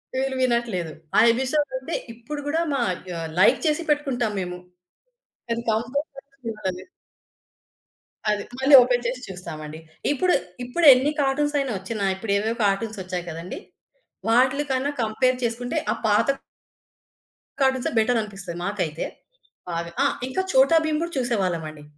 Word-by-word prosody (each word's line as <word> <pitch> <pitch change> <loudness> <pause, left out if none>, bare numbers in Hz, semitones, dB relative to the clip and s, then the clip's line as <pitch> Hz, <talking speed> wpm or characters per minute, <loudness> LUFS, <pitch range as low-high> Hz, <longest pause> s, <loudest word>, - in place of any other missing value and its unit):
వీళ్ళు 265 0 -1
వినట్లేదు. 235 -9 0 0.3
ఆ - - +8
ఎపిసోడ్ 265 +4 0
అంటే 265 +6 -4 0.2
ఇప్పుడు 240 +6 -7
గూడా 320 +3 +1
మ - - +1 0.4
ఆహ్, 165 -1 -4
లైక్ - - +6
చేసి 310 +2 +1
పెట్టుకుంటాం 270 -6 +1
మేము. 180 -1 -4 0.9
అది 230 0 0
కంపల్సరీ 275 +5 -3
చూస్తా 215 -4 -3
నేను. 185 - -12 1.4
అది 210 -1 0 0.2
మళ్ళీ 270 +2 +3
ఓపెన్ 245 0 +1
చేసి 250 +1 -3
చూస్తామండి. 160 -4 -7 0.3
ఇప్పుడు, 355 +5 +2 0.3
ఇప్పుడెన్ని 275 0 +6
కార్టూన్స్ 290 +2 +1
అయినా 275 -2 -1
ఒచ్చినా 200 +2 -3
ఇప్పుడేవేవో 210 +3 -1
కార్టూన్స్ 205 +1 0
ఒచ్చాయి 180 -1 -4
కదండీ! 165 +2 -6 0.7
వాటిలకన్నా 260 +3 +2
కంపేర్ 255 +4 +1
చేసుకుంటే 245 +5 -2 0.2
ఆ - - 0
పాత 210 -1 +3 1.4
కార్టూన్సే 265 -2 +2
బెటరనిపిస్తది 210 -6 -1
మాకైతే. 180 -6 -2 0.6
బాగా 170 0 -3
ఆ! - - +5 0.2
ఇంకా 375 - 0
'చోటా 270 +5 +6
భీమ్' 310 0 0
కూడా 340 0 -3
చూసేవాళ్ళమండి. 180 - -1
240 Hz, 125 wpm, -24 LUFS, 195-270 Hz, 1.4 s, ఆ